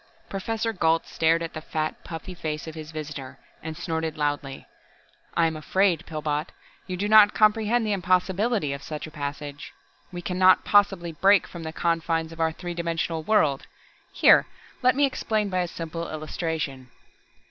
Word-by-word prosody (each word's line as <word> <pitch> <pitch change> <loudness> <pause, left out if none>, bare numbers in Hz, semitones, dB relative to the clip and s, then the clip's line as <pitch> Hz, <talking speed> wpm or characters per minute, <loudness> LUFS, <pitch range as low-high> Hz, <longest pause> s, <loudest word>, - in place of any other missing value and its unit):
Professor 225 +3 -2
Gault 165 -4 +2
stared 165 +1 +1
at 165 - -5
the 155 - -6
fat, 155 0 -3
puffy 165 +2 -7
face 155 -3 -4
of 160 - -7
his 155 -1 -8
visitor, 145 -4 -7 0.2
and 160 -1 -6
snorted 160 -2 -3
loudly. 145 -2 -2 0.7
"I 170 - +5
am 160 -1 0
afraid, 175 +2 +1
Pillbot, 150 -1 -2 0.4
you 185 -1 -4
do 205 +3 -1
not 210 -1 +7
comprehend 220 +2 +3
the 215 - -1
impossibility 185 - +1
of 140 - -6
such 150 0 -6
a 155 - -10
passage. 145 -1 -6 0.4
We 175 -1 -7
can 180 +1 -3
not 185 0 +6
possibly 195 -4 +3
break 190 +4 +4
from 170 - -9
the 160 -1 -5
confines 165 -1 -1
of 165 - -11
our 160 0 +2
three 175 +2 -6
dimensional 165 -1 -2
world. 155 -7 +2 0.4
Here, - - +6 0.3
let 255 0 +4
me 285 +1 +4
explain 215 -6 -1
by 185 -1 0
a 180 - 0
simple 165 0 -5
illustration." 155 -4 -4
165 Hz, 170 wpm, -25 LUFS, 155-190 Hz, 0.7 s, not